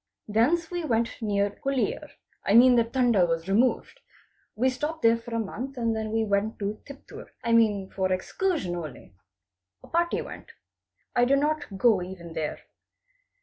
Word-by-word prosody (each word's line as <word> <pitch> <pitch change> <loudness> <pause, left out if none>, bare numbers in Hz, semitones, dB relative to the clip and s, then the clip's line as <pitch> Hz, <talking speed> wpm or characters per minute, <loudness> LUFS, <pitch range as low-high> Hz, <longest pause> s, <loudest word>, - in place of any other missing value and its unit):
Thence 295 +11 +1
we 350 -1 -3
went 230 -4 -1
near 205 -1 -1
Huliyar—I 275 - -2
mean 250 +2 +8
the 235 - +5
T'anda 235 -4 +2
was 165 +1 -2
removed. 230 +6 +1 0.6
We 250 +4 +2
stopped 300 +5 -3
there 230 0 +4
a 230 -1 -3
month 245 +5 -5
and 230 -2 0
then 220 0 -3
we 225 0 +1
went 205 +2 0
to 205 +1 -4
Tiptur—I 275 -4 -8
mean 210 -4 +3
for 190 -1 -1
excursion 185 - -1
only. 155 - -8 0.7
A - - -13
party 340 +1 0
went. - - -11 0.6
I 245 - +4
did 275 +2 +3
not 290 -7 -1
go 210 -2 +4
even 175 -2 -8
there. 160 -2 -3
230 Hz, 150 wpm, -26 LUFS, 200-265 Hz, 0.7 s, mean